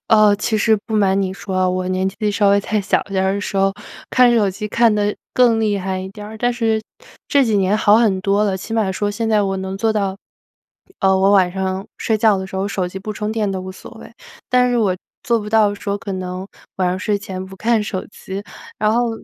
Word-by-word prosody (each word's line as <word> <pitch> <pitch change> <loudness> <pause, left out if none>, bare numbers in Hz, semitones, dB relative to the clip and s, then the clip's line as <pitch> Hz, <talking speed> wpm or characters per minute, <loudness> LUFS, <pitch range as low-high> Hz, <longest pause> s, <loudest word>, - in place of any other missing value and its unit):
呃， 215 -2 +6
其 220 +1 -1
实 220 +1 +3
不 220 - -3
瞒 195 -2 +3
你 190 -1 -1
说， 185 -1 -1
我 185 0 -2
年 185 +1 0
纪 210 +2 -2
稍 205 -1 +3
微 200 0 +4
再 210 +1 -1
小 200 - +1
点 190 -1 -1
儿 190 +1 +1
的 200 - -2
时 205 - -4
候， 195 0 +3 0.4
看 250 -1 +5
手 210 -4 +3
机 210 +3 -5
看 230 0 +3
得 205 0 0 0.2
更 240 -3 +4
厉 210 -2 +1
害 190 0 -3
一 190 0 -5
点 205 +1 -10
儿。 215 +1 -9
但 245 +1 +1
是 225 -2 0 0.5
这 280 -2 +3
几 220 -4 +1
年 195 +2 +2
好 210 0 +5
很 205 -5 +2
多 200 +2 +2
了， 195 -2 0
起 205 +4 -8
码 215 -4 +1
说 205 +2 -1
现 225 +2 -2
在 210 -2 +3
我 195 -1 -1
能 190 0 -4
做 220 +1 +1
到， 195 -2 -1 0.8
呃， 190 -1 +4
我 195 +1 +4
晚 185 -3 +4
上 190 +1 -3
睡 220 - 0
觉 215 -2 +4
的 190 - -4
时 190 - -12
候， 195 +1 -1
手 190 -2 -2
机 180 - -9
不 215 +2 -5
充 210 +1 -3
电 215 -3 -1
都 190 -1 -3
无 185 0 -7
所 - - -12
谓。 - - -12 0.4
但 250 0 +3
是 245 - +1
我 195 -5 +1 0.3
做 235 -4 +2
不 210 - -6
到 220 -1 +4
的 205 - -3
时 200 - -5
候 200 - -1
可 200 -3 -6
能 185 0 -5 0.3
晚 185 -1 +1
上 180 - -1
睡 205 +2 -1
前 190 -2 -6
不 190 0 -11
看 225 +1 +1
手 190 -3 -4
机。 195 -1 -7 0.4
然 215 0 +2
后 240 0 +1
205 Hz, 270 characters per minute, -19 LUFS, 190-220 Hz, 0.8 s, 呃